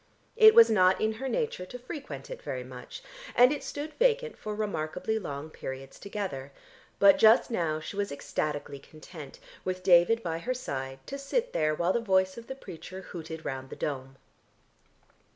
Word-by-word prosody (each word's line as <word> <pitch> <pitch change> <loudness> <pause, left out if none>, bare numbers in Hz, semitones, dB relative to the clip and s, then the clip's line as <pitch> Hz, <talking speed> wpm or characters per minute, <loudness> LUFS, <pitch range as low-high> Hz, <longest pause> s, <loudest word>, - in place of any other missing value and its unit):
It 440 -1 +8
was 465 0 +10
not 185 -3 +4
in 220 0 +1
her 270 - -2
nature 450 - -2
to 250 - -7
frequent 280 - -8
it - - -7
very - - -4
much, - - -10 0.3
and 250 +2 +7
it 295 - -3
stood 300 +2 -5
vacant 480 -1 +2
for 215 -1 -5
remarkably 200 0 -2
long 145 -4 -6
periods 135 -1 -8
together, 190 -10 -5 0.5
but 200 -1 +6
just 225 +3 +6
now 165 -7 0
she 155 +5 -7
was 200 0 -2
ecstatically 145 0 -3
content, 155 0 -12 0.3
with 185 0 -3
David 185 +5 +5
by 165 -1 -2
her 255 +8 -2
side, 135 - -5
to 275 - -6
sit - - -1
there 155 0 +1
while 175 +3 +1
the - - +2
voice 190 -3 +2
of 230 0 -10
the 265 - -5
preacher 185 -5 -9
hooted 160 -3 -8
round 130 -1 -4
the - - -7
dome. 135 -2 -4
185 Hz, 175 wpm, -29 LUFS, 155-245 Hz, 0.5 s, was